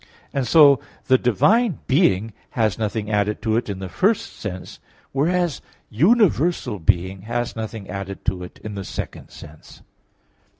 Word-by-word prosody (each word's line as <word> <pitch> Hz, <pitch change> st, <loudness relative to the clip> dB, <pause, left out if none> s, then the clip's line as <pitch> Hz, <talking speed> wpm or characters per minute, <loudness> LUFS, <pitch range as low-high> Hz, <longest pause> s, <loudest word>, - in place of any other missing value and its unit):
And 135 Hz, -3 st, -1 dB
so 140 Hz, -1 st, +7 dB, 0.3 s
the 130 Hz, -1 st, +4 dB
divine 190 Hz, -, +3 dB
being 115 Hz, -, +2 dB, 0.2 s
has 110 Hz, -4 st, +1 dB
nothing 110 Hz, 0 st, -2 dB
added 105 Hz, 0 st, 0 dB
to 110 Hz, -2 st, +1 dB
it 115 Hz, -1 st, -1 dB
in 100 Hz, -, -3 dB
the 95 Hz, 0 st, -6 dB
first 200 Hz, -, 0 dB
sense; 95 Hz, -3 st, -7 dB, 0.3 s
whereas 170 Hz, +3 st, 0 dB, 0.3 s
universal 170 Hz, -, +2 dB
being 95 Hz, +2 st, 0 dB
has 120 Hz, 0 st, -2 dB
nothing 110 Hz, -2 st, -6 dB
added 100 Hz, 0 st, -6 dB
to 90 Hz, 0 st, -1 dB
it 90 Hz, -, -11 dB
in 110 Hz, -, -6 dB
the 100 Hz, -1 st, -5 dB
second -, -, -7 dB
sense. 75 Hz, +1 st, -14 dB
110 Hz, 145 wpm, -22 LUFS, 100-140 Hz, 0.3 s, so